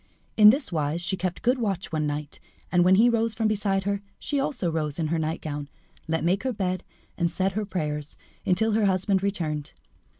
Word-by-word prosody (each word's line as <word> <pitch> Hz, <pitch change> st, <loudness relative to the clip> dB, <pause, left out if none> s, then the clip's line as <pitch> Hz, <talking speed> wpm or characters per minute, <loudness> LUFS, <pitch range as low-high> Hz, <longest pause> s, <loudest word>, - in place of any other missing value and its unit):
In 210 Hz, -1 st, +9 dB
this 270 Hz, +2 st, +2 dB
wise 155 Hz, 0 st, -1 dB
she 190 Hz, -, 0 dB
kept 180 Hz, -1 st, -3 dB
good 250 Hz, +2 st, +2 dB
watch 195 Hz, -6 st, -2 dB
one 155 Hz, -2 st, 0 dB
night, 145 Hz, 0 st, -5 dB, 0.3 s
and, 175 Hz, -1 st, +4 dB
when 185 Hz, +1 st, +6 dB
he 225 Hz, +5 st, +6 dB
rose 230 Hz, -2 st, +2 dB
from 220 Hz, -1 st, +1 dB
beside 200 Hz, -2 st, +1 dB
her, 200 Hz, 0 st, -1 dB, 0.2 s
she 285 Hz, -, -1 dB
also 235 Hz, -, -1 dB
rose 150 Hz, -3 st, -2 dB
in 160 Hz, -3 st, -1 dB
her 165 Hz, 0 st, 0 dB
nightgown, 155 Hz, -2 st, -3 dB, 0.4 s
let 160 Hz, 0 st, -1 dB
make 185 Hz, +4 st, +2 dB
her 260 Hz, -, -1 dB
bed, 185 Hz, -4 st, -2 dB, 0.4 s
and 170 Hz, -1 st, +2 dB
said 190 Hz, +3 st, 0 dB
her 210 Hz, +2 st, -2 dB
prayers 150 Hz, -6 st, -4 dB, 0.3 s
until 220 Hz, +5 st, +2 dB
her 215 Hz, 0 st, +2 dB
husband 190 Hz, 0 st, +1 dB
returned. 155 Hz, -7 st, -2 dB
185 Hz, 200 wpm, -26 LUFS, 160-210 Hz, 0.4 s, In